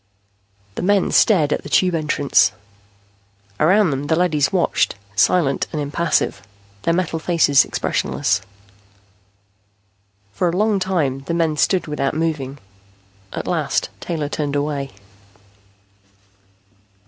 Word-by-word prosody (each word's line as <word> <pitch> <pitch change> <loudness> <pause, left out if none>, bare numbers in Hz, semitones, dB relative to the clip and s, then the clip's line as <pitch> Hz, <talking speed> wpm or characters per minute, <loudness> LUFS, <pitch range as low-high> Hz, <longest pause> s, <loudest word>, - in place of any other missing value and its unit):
The - - -5
men 200 0 +2
stared 160 -9 +4
at - - -2
the - - -10
Tube 180 +3 +3
entrance. 150 -3 +2 1.1
Around 185 +2 +4
them 140 +1 -3
the 160 - +2
leadys 160 -5 +1
watched, 185 -3 +1 0.2
silent 140 - +2
and 155 - -3
impassive, 145 -7 -1 0.4
their 165 - +1
metal 170 -2 -1
faces 155 -5 +4
expressionless. - - -1 1.9
For 175 - 0
a 170 - -2
long 210 -1 +2
time 165 -8 -1
the 170 - -1
men 165 -2 +1
stood 180 +5 +1
without 150 -2 -2
moving. 150 -4 -2 0.7
At - - -5
last - - -1
Taylor 155 -4 -3
turned 145 -1 -3
away. 145 -1 -2
155 Hz, 115 wpm, -20 LUFS, 145-180 Hz, 1.9 s, stared